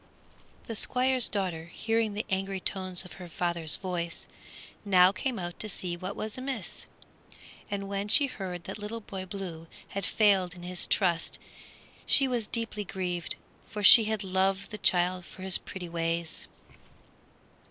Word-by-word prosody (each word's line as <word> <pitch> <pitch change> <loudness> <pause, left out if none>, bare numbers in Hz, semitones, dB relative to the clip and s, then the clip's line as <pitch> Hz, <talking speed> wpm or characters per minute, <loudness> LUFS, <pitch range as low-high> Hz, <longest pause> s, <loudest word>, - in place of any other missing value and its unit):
The 225 - -5
Squire's 255 +2 +3
daughter, 180 -6 -2
hearing 225 +4 -1
the 215 - -2
angry 195 0 -1
tones 185 -1 -2
of 180 - -11
her 180 - -7
father's 170 -1 +2
voice, 175 -3 -3 0.6
now 185 -2 +6
came 240 +5 -2
out 175 -2 -5
to 215 - -2
see 180 -2 -3
what 185 +1 -5
was 215 +3 -5
amiss, 255 -5 -4 0.8
and 200 -1 -3
when 200 +1 -2
she 280 +7 +5
heard 185 -9 -5
that - - -7
Little 215 +2 -5
Boy 190 -2 -7
Blue 175 -4 -6 0.2
had 200 - -4
failed 190 -3 +3
in 175 - -11
his 180 0 0
trust 175 -4 +2 0.7
she 275 - +4
was 240 -4 -1
deeply 225 -2 -2
grieved, 180 -3 -3 0.3
for 210 -1 -5
she 220 +2 +10
had 215 -1 -1
loved 190 +1 0
the 210 - -6
child 180 0 +3
for 185 +1 -11
his 190 -1 +1
pretty 180 -2 -7
ways. 165 0 -2
190 Hz, 155 wpm, -29 LUFS, 180-210 Hz, 0.8 s, she